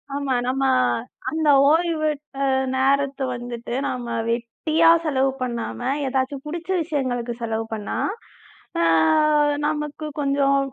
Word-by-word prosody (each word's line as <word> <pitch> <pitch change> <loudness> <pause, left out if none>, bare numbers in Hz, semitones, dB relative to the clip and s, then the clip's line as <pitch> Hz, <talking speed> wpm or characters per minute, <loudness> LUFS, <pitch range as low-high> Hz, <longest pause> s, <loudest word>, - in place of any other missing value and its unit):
ஆமா. 280 -2 -1
நம்ம 265 +2 0 0.7
அந்த 315 -1 -1 0.2
ஓய்வு 320 -1 +2 0.3
அ - - +2 0.3
நேரத்தை 275 +1 +1
வந்துட்டு, 240 -1 -6
நாம 240 -3 -3
வெட்டியா 310 +8 +1 0.2
செலவு 270 -3 +2
பண்ணாம, 240 -2 -3 0.3
ஏதாச்சும் 265 +1 -2
புடிச்ச 340 +3 -6
விஷயங்களுக்கு 255 -6 -2
செலவு 225 -1 -2
பண்ணா, 210 -2 -4 0.8
அ - - +3 0.8
நமக்குக் 300 0 -4
கொஞ்சம் 275 0 +2
275 Hz, 105 wpm, -23 LUFS, 245-300 Hz, 0.8 s, அ